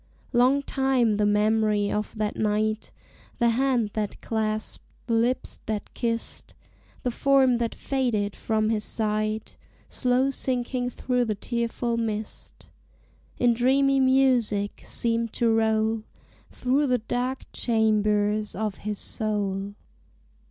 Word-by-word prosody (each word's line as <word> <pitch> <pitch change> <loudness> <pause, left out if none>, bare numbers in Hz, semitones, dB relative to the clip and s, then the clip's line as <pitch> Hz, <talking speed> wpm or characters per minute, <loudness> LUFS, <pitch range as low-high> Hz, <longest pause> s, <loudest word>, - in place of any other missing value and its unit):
Long 255 +4 +4
time 265 -6 +1
the 210 0 +2
memory 210 0 +2
of 210 +1 -3
that 215 -1 -2
night 215 0 0 0.5
The 235 -1 +3
hand 240 -3 +1
that 210 -2 -3
clasped, 215 -1 -2 0.2
the 235 - -1
lips 235 +3 0
that 215 -1 -4
kissed, 230 -2 -3 0.5
The 250 - 0
form 265 -1 +3
that 235 -1 -2
faded 235 -7 -1
from 215 -1 0
his 215 -2 0
sight 215 0 -2 0.3
Slow 255 +1 +1
sinking 250 -1 -2
through 250 0 0
the 215 -2 -1
tearful 235 +2 -2
mist 220 -2 -5 0.7
In 240 -1 +4
dreamy 270 +3 +3
music 255 -6 +2
seemed 230 -1 -1
to 230 -1 +2
roll 220 0 +2 0.5
Through 270 +3 +1
the 250 -1 +3
dark 245 +3 -3
chambers 215 -2 +1
of 210 -1 -2
his 210 0 -4
soul. 200 -2 -2
225 Hz, 120 wpm, -26 LUFS, 215-250 Hz, 0.7 s, Long